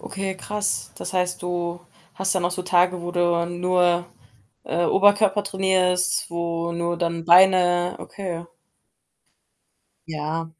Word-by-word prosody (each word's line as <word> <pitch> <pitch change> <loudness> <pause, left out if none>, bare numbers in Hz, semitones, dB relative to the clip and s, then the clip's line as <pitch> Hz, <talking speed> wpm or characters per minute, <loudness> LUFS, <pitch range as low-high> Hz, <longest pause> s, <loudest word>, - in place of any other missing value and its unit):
Okay, 195 0 -5
krass. 205 +2 -2
Das - - -6
heißt, 180 -1 -1
du 175 0 -3 0.3
hast 190 +1 0
dann 185 -2 -1
auch 175 - +1
so 180 0 -4
Tage, 180 0 +2
wo 175 - -4
du 175 -1 +1
nur, 175 0 +1 0.6
äh, 170 +1 -1
Oberkörper 205 +2 +3
trainierst, 185 -2 +1
wo 170 0 -3
nur 170 0 -2
dann 170 -1 -2
Beine? 180 0 +4
Okay. 175 -4 -6 1.6
Ja. 160 +1 -4
175 Hz, 125 wpm, -23 LUFS, 170-185 Hz, 1.6 s, Beine